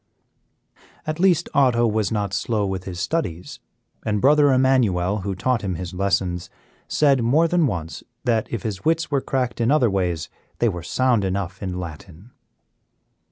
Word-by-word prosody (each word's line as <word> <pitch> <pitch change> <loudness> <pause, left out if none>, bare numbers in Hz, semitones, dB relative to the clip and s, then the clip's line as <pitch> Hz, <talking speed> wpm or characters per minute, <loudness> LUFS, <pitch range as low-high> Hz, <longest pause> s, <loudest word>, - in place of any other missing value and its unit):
At 155 +1 -3
least 175 -2 +3
Otto 125 -5 +3
was 110 -1 0
not 100 -3 -1
slow 105 +1 0
with 95 -1 -4
his 90 -2 -6
studies, 95 - -3 0.4
and 105 -1 0
Brother 145 +3 +5
Emmanuel, 110 -8 +2
who 95 0 -3
taught 125 +5 0
him 95 -3 -2
his 90 +1 -6
lessons, 90 -2 -1 0.4
said 140 -4 +3
more 145 +9 +3
than 170 -2 +2
once 85 -7 -4 0.2
that, 115 -2 0
if 115 - -3
his 105 -4 -4
wits 165 +1 +1
were 140 -1 +1
cracked 125 -3 -2
in 115 - +2
other 135 -7 +3
ways, 90 -4 -1 0.3
they 120 - +2
were 90 -4 -4
sound 125 +4 +1
enough 95 -1 -3
in 90 -2 -4
Latin. 90 +5 -9
105 Hz, 160 wpm, -22 LUFS, 95-130 Hz, 0.4 s, Brother